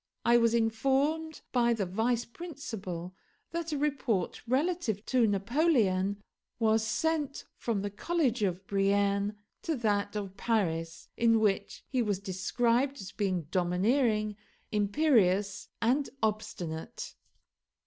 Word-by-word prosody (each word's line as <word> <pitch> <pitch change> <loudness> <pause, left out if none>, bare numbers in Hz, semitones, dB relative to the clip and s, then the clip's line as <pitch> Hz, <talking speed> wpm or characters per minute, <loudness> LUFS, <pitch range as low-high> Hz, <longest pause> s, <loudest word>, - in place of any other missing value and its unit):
I 235 - +5
was 230 -1 +3
informed 275 +8 +1
by 240 -2 +3
the 210 -4 -1
vice 225 +6 0
principal 220 - -6 0.4
that 335 -1 -3
a 300 - -1
report 270 -10 -1
relative 260 - 0
to 250 -3 +3
Napoleon 205 - +2 0.3
was 220 -1 +3
sent 290 +6 -1
from 215 -4 -2
the 205 - -3
College 260 - 0
of 190 -1 -1
Brienne 200 +1 +1 0.2
to 325 - -1
that 205 -4 0
of 195 -2 -4
Paris, 165 -8 -1
in 230 -1 +4
which 205 -2 0
he 255 -2 0
was 205 -4 0
described 235 +7 0
as 195 - -7
being 185 -5 -1
domineering, 210 +4 +1 0.3
imperious, 205 - +2
and 270 +5 +2
obstinate. 195 -7 -3
220 Hz, 120 wpm, -30 LUFS, 200-260 Hz, 0.4 s, I